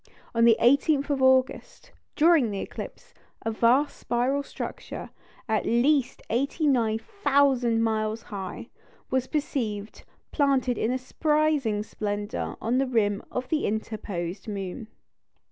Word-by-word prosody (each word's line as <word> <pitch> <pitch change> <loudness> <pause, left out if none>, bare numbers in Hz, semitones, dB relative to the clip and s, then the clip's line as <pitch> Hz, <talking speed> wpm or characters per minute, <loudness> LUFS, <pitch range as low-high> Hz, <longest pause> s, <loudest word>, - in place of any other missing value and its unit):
On 230 0 +4
the 230 -1 +6
18th 280 +3 +3
of 275 -2 0
August, 260 - +1 0.2
during 315 -6 +4
the 200 - -4
eclipse, - - -8 0.3
a 225 - -1
vast 245 +6 +2
spiral 250 +4 0
structure, - - -7 0.4
at 220 -2 +1
least 255 +2 +2
89,000 260 - +1
miles 220 0 -1
high, 195 -2 -7 0.4
was 260 0 +1
perceived, 225 -9 -3 0.3
planted 270 -4 +1
in 250 +3 +1
surprising 290 -5 +1
splendour 205 0 -4
on 240 +3 0
the 270 - +1
rim 205 -5 +1
of 250 0 -4
the 310 -1 +1
interposed 205 -4 -4
moon. 200 +2 -5
240 Hz, 115 wpm, -26 LUFS, 220-280 Hz, 0.4 s, the